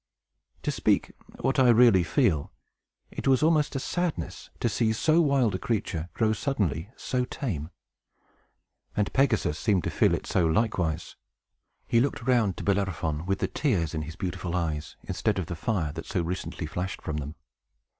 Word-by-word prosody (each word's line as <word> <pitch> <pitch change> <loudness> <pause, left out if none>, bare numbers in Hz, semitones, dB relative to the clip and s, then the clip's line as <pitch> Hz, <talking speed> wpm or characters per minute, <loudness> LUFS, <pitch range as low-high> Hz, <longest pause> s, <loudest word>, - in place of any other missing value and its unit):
To - - 0
speak - - +1 0.3
what 135 +2 +1
I 130 -2 +6
really 115 -5 +6
feel, 85 - +1 0.6
it - - -5
was 135 +1 +4
almost 155 -3 +3
a - - 0
sadness 175 +4 -3
to - - +1
see 110 0 +1
so 155 +9 +3
wild 140 -8 +3
a 95 - -2
creature 90 -7 -2
grow 110 -1 +2
suddenly 105 - -1
so 125 -1 -1
tame. 90 - -4 1.3
And 105 -1 0
Pegasus 115 - +2
seemed 100 -5 +2
to - - -2
feel - - +3
it - - -6
so, 85 - +2
likewise. 85 -4 0 0.7
He 115 - +3
looked 130 -1 0
round 120 -7 +2
to - - -5
Bellerophon, 90 -5 -1
with 95 0 +1
the - - -1
tears 90 - 0
in 80 - -2
his 80 +1 -7
beautiful 90 0 -3
eyes, 80 -4 -2
instead - - -1
of 95 - -1
the 85 - -5
fire 80 -2 -1
that 80 - -7
so 90 -5 -1
recently 90 -1 -4
flashed 90 +4 -4
from 75 - -3
them. 75 +2 -5
100 Hz, 170 wpm, -27 LUFS, 85-125 Hz, 1.3 s, I